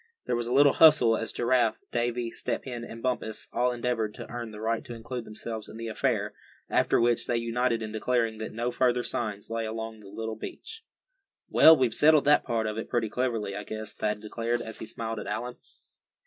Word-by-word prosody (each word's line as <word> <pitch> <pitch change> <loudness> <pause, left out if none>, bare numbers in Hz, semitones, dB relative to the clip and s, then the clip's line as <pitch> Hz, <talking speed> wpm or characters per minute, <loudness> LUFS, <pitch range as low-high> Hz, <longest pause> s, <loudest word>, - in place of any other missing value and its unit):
There 120 - 0
was 120 0 -2
a - - -3
little 140 +2 +6
hustle 150 -8 +6
as 115 - -3
Giraffe, 120 -2 +2
Davy, 120 0 -1
Step - - -3
Hen 120 -3 -5
and 115 -1 -9
Bumpus 120 -4 -2
all 125 +1 +2
endeavored 120 -3 -2
to - - -8
earn 120 -1 -5
the 105 -1 -10
right 110 +1 -1
to 120 - -8
include 115 +1 -6
themselves 110 0 -6
in - - -10
the 115 0 -5
affair; 110 - 0 0.4
after - - +3
which 120 0 +2
they 120 - +1
united 115 0 0
in 110 - -5
declaring 115 0 0
that 110 - -5
no 120 +2 -2
further 125 -1 +2
signs 105 -3 -3
lay 115 0 -1
along 110 0 -5
the 105 - -14
little 110 +2 -5
beach. 450 - -8 0.7
"Well, 160 0 +8
we've 125 -4 +1
settled 155 +1 +5
that 145 +1 +5
part 115 -3 -1
of 110 0 -2
it - - -6
pretty 120 -3 0
cleverly, 115 -4 -1
I 105 - -4
guess," 110 0 -6
Thad 105 -1 -2
declared, 115 +2 -2
as 110 -1 -8
he - - -6
smiled 115 -1 -4
at - - -7
Allan. 120 +4 -4
115 Hz, 210 wpm, -28 LUFS, 110-125 Hz, 0.7 s, Well